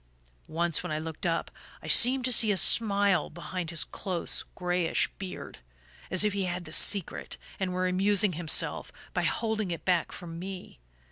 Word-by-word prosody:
"Once, 165 Hz, 0 st, 0 dB
when -, -, -6 dB
I 155 Hz, -, -1 dB
looked 160 Hz, +2 st, -3 dB
up, 165 Hz, 0 st, -2 dB, 0.3 s
I -, -, -8 dB
seemed 255 Hz, +1 st, +5 dB
to 255 Hz, -, +1 dB
see 220 Hz, -1 st, +5 dB
a 195 Hz, -, 0 dB
smile 200 Hz, -3 st, +3 dB
behind 175 Hz, +1 st, -5 dB
his 165 Hz, -3 st, +1 dB
close 180 Hz, +3 st, -3 dB
grayish 180 Hz, -1 st, 0 dB
beard 185 Hz, -, -8 dB, 0.5 s
as 185 Hz, +2 st, +2 dB
if 210 Hz, -1 st, +1 dB
he 200 Hz, -1 st, -1 dB
had 180 Hz, 0 st, -4 dB
the 155 Hz, -, -8 dB
secret, 195 Hz, -1 st, +2 dB, 0.2 s
and 190 Hz, -2 st, -1 dB
were 185 Hz, 0 st, 0 dB
amusing 195 Hz, +1 st, +3 dB
himself 165 Hz, -1 st, 0 dB, 0.2 s
by -, -, 0 dB
holding 220 Hz, -3 st, -1 dB
it 170 Hz, -, -5 dB
back 180 Hz, -3 st, +1 dB
from 165 Hz, -2 st, -8 dB
me. 185 Hz, -, -8 dB
180 Hz, 175 wpm, -28 LUFS, 170-200 Hz, 0.5 s, seemed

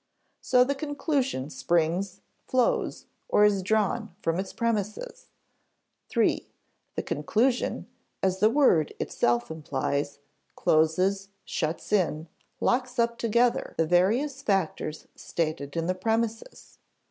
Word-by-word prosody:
So 250 Hz, -1 st, +4 dB
the 275 Hz, +3 st, 0 dB
conclusion 275 Hz, -, -2 dB
springs, 175 Hz, +4 st, 0 dB, 0.3 s
flows, 255 Hz, -2 st, +1 dB, 0.2 s
or 210 Hz, -, +5 dB
is 200 Hz, -2 st, +3 dB
drawn 215 Hz, 0 st, 0 dB
from 165 Hz, +2 st, 0 dB
its 190 Hz, 0 st, -4 dB
premises. 230 Hz, -, -3 dB, 0.8 s
(3) -, -, +1 dB, 0.5 s
The -, -, -2 dB
conclusion 245 Hz, +3 st, 0 dB, 0.4 s
as 190 Hz, 0 st, +1 dB
the 215 Hz, -, +5 dB
word 230 Hz, -, +3 dB
itself 120 Hz, +1 st, 0 dB
implies 145 Hz, -2 st, -2 dB, 0.4 s
closes, 185 Hz, +5 st, +2 dB, 0.2 s
shuts 160 Hz, +5 st, -3 dB
in, 165 Hz, -5 st, +1 dB, 0.3 s
locks 250 Hz, 0 st, 0 dB
up 235 Hz, 0 st, +1 dB
together 235 Hz, +1 st, +1 dB
the 165 Hz, -, +3 dB
various 225 Hz, -, +2 dB
factors 185 Hz, -, -1 dB
stated 155 Hz, -2 st, -3 dB
in 165 Hz, -, 0 dB
the 180 Hz, -, +1 dB
premises. 225 Hz, -, -3 dB
200 Hz, 110 wpm, -27 LUFS, 165-240 Hz, 0.8 s, or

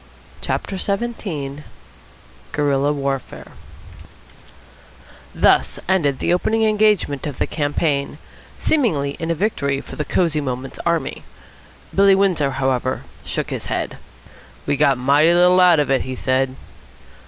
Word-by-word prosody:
CHAPTER 195 Hz, -, -3 dB
XVII 195 Hz, -11 st, -3 dB, 0.9 s
GUERILLA 145 Hz, -1 st, +1 dB
WARFARE 140 Hz, -2 st, -4 dB, 1.8 s
Thus -, -, +3 dB
ended 160 Hz, -8 st, +2 dB
the 175 Hz, -, 0 dB
opening 220 Hz, +5 st, +1 dB
engagement 210 Hz, -10 st, +2 dB
of 145 Hz, -, -6 dB
the -, -, 0 dB
campaign, 145 Hz, -1 st, -1 dB, 0.4 s
seemingly 170 Hz, -, +1 dB
in 165 Hz, -, -3 dB
a 165 Hz, -, +1 dB
victory 140 Hz, -8 st, -1 dB
for -, -, -10 dB
the 150 Hz, -, -1 dB
Cosy 155 Hz, 0 st, 0 dB
Moments 130 Hz, -1 st, -5 dB
army. 170 Hz, -5 st, -1 dB, 0.7 s
Billy 195 Hz, 0 st, +5 dB
Windsor, 185 Hz, -8 st, +2 dB
however, 130 Hz, -1 st, -1 dB, 0.2 s
shook -, -, -3 dB
his -, -, -4 dB
head. -, -, -3 dB, 0.7 s
"We've 140 Hz, -, -1 dB
got 135 Hz, -2 st, +4 dB
mighty 145 Hz, +6 st, +4 dB
little 180 Hz, +1 st, +5 dB
out 175 Hz, -3 st, +6 dB
of 145 Hz, -2 st, 0 dB
it," 135 Hz, -, +3 dB
he 130 Hz, 0 st, -5 dB
said. 130 Hz, +1 st, 0 dB
150 Hz, 125 wpm, -20 LUFS, 140-185 Hz, 1.8 s, out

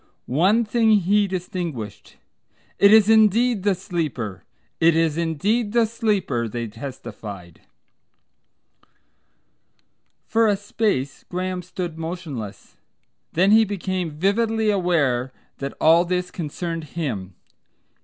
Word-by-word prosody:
One 190 Hz, -, +2 dB
thing 220 Hz, 0 st, +3 dB
he 200 Hz, +3 st, +2 dB
distinguished: 170 Hz, -, -5 dB, 0.6 s
"It 200 Hz, -, +7 dB
is 215 Hz, -2 st, +7 dB
indeed 220 Hz, +1 st, +4 dB
the 200 Hz, 0 st, +2 dB
Sleeper. 155 Hz, -, -4 dB, 0.4 s
It 165 Hz, 0 st, +4 dB
is 165 Hz, -2 st, +2 dB
indeed 200 Hz, +8 st, 0 dB
the 235 Hz, -1 st, +4 dB
Sleeper," 205 Hz, -, -1 dB
they 115 Hz, +2 st, -4 dB
testified. 105 Hz, -, -9 dB, 2.6 s
For 225 Hz, 0 st, +2 dB
a 205 Hz, -2 st, +2 dB
space 205 Hz, -, -2 dB
Graham 185 Hz, 0 st, -3 dB
stood 175 Hz, -2 st, -6 dB
motionless. 160 Hz, -, -7 dB, 0.6 s
Then 185 Hz, +4 st, +3 dB
he 220 Hz, +1 st, +7 dB
became 185 Hz, -4 st, -3 dB
vividly 215 Hz, +7 st, +1 dB
aware 145 Hz, -10 st, +1 dB, 0.3 s
that 140 Hz, 0 st, -5 dB
all 165 Hz, +2 st, +5 dB
this 180 Hz, 0 st, -2 dB
concerned 165 Hz, 0 st, -4 dB
him. 105 Hz, -, -4 dB
180 Hz, 105 wpm, -22 LUFS, 145-205 Hz, 2.6 s, It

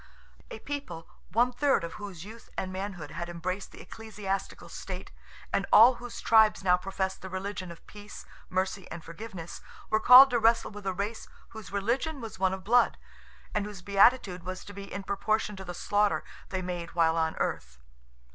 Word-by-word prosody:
A 470 Hz, -, -7 dB
people, 275 Hz, -, -6 dB, 0.2 s
one 245 Hz, +2 st, +3 dB
third 270 Hz, -, +2 dB
of 165 Hz, -1 st, -5 dB
whose 190 Hz, -4 st, -8 dB
youth 225 Hz, +2 st, -12 dB
and 185 Hz, 0 st, -3 dB
manhood 190 Hz, -5 st, -5 dB
had 170 Hz, 0 st, -5 dB
embraced 185 Hz, +3 st, -4 dB
the -, -, -12 dB
ecclesiastical 210 Hz, -3 st, -5 dB
state, -, -, -7 dB, 0.4 s
and -, -, +1 dB
all 235 Hz, +3 st, +8 dB
whose 245 Hz, -1 st, -7 dB
tribes 220 Hz, -3 st, +5 dB
now 180 Hz, -1 st, +5 dB
professed 190 Hz, +1 st, -3 dB
the 190 Hz, -, -7 dB
religion 190 Hz, 0 st, -5 dB
of 170 Hz, -, -13 dB
peace, 205 Hz, 0 st, -11 dB, 0.2 s
mercy, 190 Hz, +1 st, -2 dB
and 170 Hz, -1 st, -8 dB
forgiveness, 170 Hz, -1 st, -8 dB, 0.3 s
were 215 Hz, -, +4 dB
called 255 Hz, +3 st, +9 dB
to 240 Hz, -, +2 dB
wrestle 230 Hz, 0 st, +3 dB
with 205 Hz, -1 st, -8 dB
a 190 Hz, -, 0 dB
race 205 Hz, +4 st, -4 dB, 0.2 s
whose 220 Hz, -5 st, -10 dB
religion 240 Hz, +10 st, -1 dB
was 225 Hz, -5 st, -8 dB
one 190 Hz, -1 st, +2 dB
of 190 Hz, 0 st, -5 dB
blood, 240 Hz, +5 st, +3 dB, 0.6 s
and 210 Hz, -1 st, -1 dB
whose 200 Hz, -3 st, -9 dB
beatitude 200 Hz, -1 st, +4 dB
was 185 Hz, +1 st, -7 dB
to 205 Hz, -, -10 dB
be 200 Hz, 0 st, -9 dB
in 200 Hz, -, -5 dB
proportion 210 Hz, +2 st, -1 dB
to 190 Hz, -, -8 dB
the 175 Hz, -1 st, -7 dB
slaughter 205 Hz, +2 st, +1 dB, 0.3 s
they 185 Hz, -1 st, -3 dB
made 175 Hz, -2 st, -5 dB
while 165 Hz, -1 st, +3 dB
on 160 Hz, -1 st, 0 dB
earth. -, -, -3 dB
200 Hz, 185 wpm, -29 LUFS, 185-220 Hz, 0.6 s, called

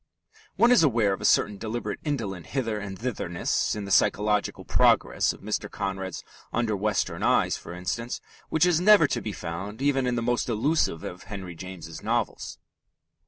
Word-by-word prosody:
One 235 Hz, +1 st, +5 dB
is 250 Hz, -, +6 dB
aware 115 Hz, -9 st, +3 dB
of -, -, -5 dB
a -, -, -3 dB
certain 100 Hz, -1 st, +3 dB
deliberate 115 Hz, +3 st, -4 dB
indolent 110 Hz, -, -3 dB
hither 115 Hz, -6 st, -2 dB
and 100 Hz, -2 st, -6 dB
thitherness 105 Hz, -8 st, -1 dB
in 105 Hz, -1 st, -4 dB
the 100 Hz, -, -6 dB
psychological 105 Hz, +1 st, +2 dB
progress -, -, +3 dB
of -, -, -12 dB
Mr. 105 Hz, +1 st, -3 dB
Conrad's 95 Hz, -2 st, -4 dB, 0.3 s
Under 115 Hz, -2 st, 0 dB
Western 105 Hz, 0 st, -1 dB
Eyes, -, -, +3 dB
for -, -, -9 dB
instance, 115 Hz, +7 st, -3 dB, 0.3 s
which 160 Hz, +2 st, +3 dB
is 175 Hz, -2 st, +3 dB
never 205 Hz, -3 st, +7 dB
to -, -, -1 dB
be 110 Hz, -, -4 dB
found 95 Hz, +5 st, -6 dB
even 135 Hz, -2 st, +1 dB
in 125 Hz, -, 0 dB
the 115 Hz, -, -1 dB
most 120 Hz, +1 st, 0 dB
elusive 115 Hz, -, +1 dB
of 90 Hz, 0 st, -7 dB
Henry 95 Hz, -4 st, -7 dB
James's 85 Hz, -2 st, -9 dB
novels. -, -, -2 dB
105 Hz, 170 wpm, -26 LUFS, 95-125 Hz, 0.3 s, never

